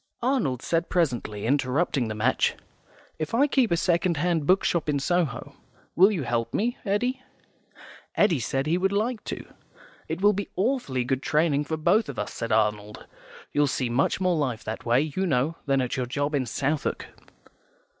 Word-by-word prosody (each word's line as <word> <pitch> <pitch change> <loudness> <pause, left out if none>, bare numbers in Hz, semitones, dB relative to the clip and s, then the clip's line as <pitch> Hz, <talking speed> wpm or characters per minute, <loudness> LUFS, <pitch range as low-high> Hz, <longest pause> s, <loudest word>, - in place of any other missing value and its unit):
Arnold 235 - 0
said 165 0 0
presently, 120 - -1
interrupting 135 0 +1
the 110 - -4
match, 115 +5 +1 0.6
"If 155 +7 -2
I 275 +5 +5
keep 265 -5 +2
a 170 - +2
second 170 -1 +1
hand 165 -2 0
bookshop 180 -4 +2
in 145 - +1
Soho, 165 -3 -1 0.4
will 190 +4 +6
you 175 -9 -2
help 120 -2 -2
me, 240 +4 0
Eddy?" 245 +5 -1 0.9
Eddy 175 -8 +3
said 135 +3 -1
he 165 +4 +1
would 195 +1 +1
like 220 +3 -1
to. - - -5 0.6
"It 160 - -3
will 205 +1 +5
be 200 0 -4
awfully 190 - 0
good 130 +1 -1
training 150 -1 +1
for 160 +1 -3
both 175 +5 +2
of 140 - -6
us," 105 - -4
said 115 0 -4
Arnold. 105 -1 0 0.5
"You'll 145 0 +2
see 130 -2 -1
much 135 +8 +1
more 185 -2 +2
life 130 -8 -2
that 110 +2 -6
way, 120 +3 +4
you 190 0 0
know, 140 +2 +1
than 135 -1 +2
at 125 +1 -2
your 130 -2 -2
job 145 +4 -2
in 135 -3 0
Southwark." 140 +5 -2
150 Hz, 175 wpm, -26 LUFS, 130-185 Hz, 0.9 s, will